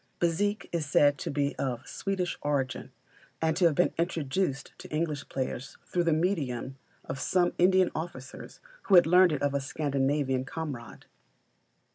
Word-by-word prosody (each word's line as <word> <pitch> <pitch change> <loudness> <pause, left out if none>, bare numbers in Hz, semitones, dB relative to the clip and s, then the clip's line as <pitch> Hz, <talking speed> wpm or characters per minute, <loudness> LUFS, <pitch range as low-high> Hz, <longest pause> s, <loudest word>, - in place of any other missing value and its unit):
Bézique 200 +5 0
is 165 -4 -2
said 145 0 +4
to - - -4
be 140 0 -1
of 130 -1 -3
Swedish 190 -3 -2
origin, 140 -3 -2 0.5
and 160 -1 +1
to 180 +1 +3
have 165 -3 +4
been 180 - +2
introduced 160 -3 -1
to - - -10
English 155 -2 -2
players 130 0 -4
through 175 -1 -1
the 165 - +3
medium 150 -7 -1 0.3
of 130 0 -5
some 175 +3 +2
Indian 185 0 +4
officers 155 -6 -7 0.2
who 195 - +5
had 175 - +8
learned 180 +2 +6
it 145 -2 -2
of 140 -1 +1
a 140 - 0
Scandinavian 135 -1 0
comrade. 135 -4 -7
150 Hz, 155 wpm, -29 LUFS, 135-175 Hz, 0.5 s, had